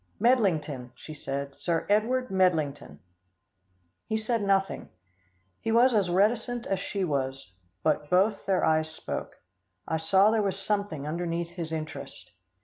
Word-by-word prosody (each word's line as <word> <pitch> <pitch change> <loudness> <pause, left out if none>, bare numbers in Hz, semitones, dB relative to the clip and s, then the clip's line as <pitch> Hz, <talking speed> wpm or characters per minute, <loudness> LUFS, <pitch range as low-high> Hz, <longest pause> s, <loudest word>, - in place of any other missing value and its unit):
"Medlington," 165 - +2
she 155 - -10
said, 140 -1 -4
"Sir 170 -2 -1
Edward 240 +4 +1
Medlington." 170 -7 +1 1.1
He 220 - 0
said 220 +1 0
nothing. 195 -1 0 0.7
He 225 - -2
was 240 +3 +5
as 200 -5 +2
reticent 225 +6 +1
as 195 - -1
she 195 0 -3
was, 135 - -2 0.3
but 150 -1 +1
both 195 +3 +2
their 190 -2 +2
eyes 155 0 +2
spoke. 160 - -6 0.5
I 160 - 0
saw 190 +6 +4
there 220 -1 +2
was 195 -2 -1
something 200 -8 -2
underneath 170 +1 -2
his 170 -2 -6
interest. 155 -1 -6
185 Hz, 140 wpm, -28 LUFS, 155-210 Hz, 1.1 s, was